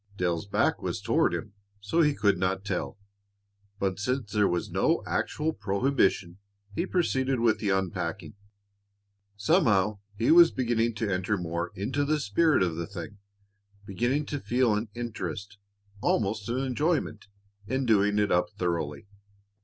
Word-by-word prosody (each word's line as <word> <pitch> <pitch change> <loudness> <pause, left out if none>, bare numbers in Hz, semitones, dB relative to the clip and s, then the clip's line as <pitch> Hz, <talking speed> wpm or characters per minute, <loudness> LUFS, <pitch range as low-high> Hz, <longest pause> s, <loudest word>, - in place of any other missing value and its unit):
Dale's 85 -1 -1
back - - +1
was - - -3
toward - - +2
him, 105 - -5 0.3
so 105 +12 +1
he 150 -2 +3
could 100 -3 +2
not 95 +2 -1
tell, 105 - -3 0.8
but 95 -1 -1
since 125 0 -2
there 105 0 +3
was 85 0 -2
no - - +1
actual 155 +1 -1
prohibition, 100 - 0 0.3
he 170 - -2
proceeded 135 -8 0
with 110 -2 +2
the 105 -1 -1
unpacking. 95 0 -2 1.0
Somehow 105 - +2 0.2
he 115 - +2
was 170 0 +8
beginning 120 -4 0
to 110 -1 -2
enter 95 +3 0
more 85 0 -3
into 130 +9 -1
the 150 +1 +1
spirit 145 - +2
of 85 -3 -1
the 85 -1 -3
thing, 100 +2 -8 0.7
beginning 120 +9 0
to 145 0 -4
feel 125 -3 +1
an 105 +2 -2
interest, 105 -3 -5 0.4
almost 105 0 0
an 120 - -1
enjoyment, 135 -3 -1 0.4
in 130 +3 -1
doing 105 -2 +3
it 105 -1 +2
up 90 - +2
thoroughly. 85 -5 -2
105 Hz, 145 wpm, -28 LUFS, 95-130 Hz, 1.0 s, was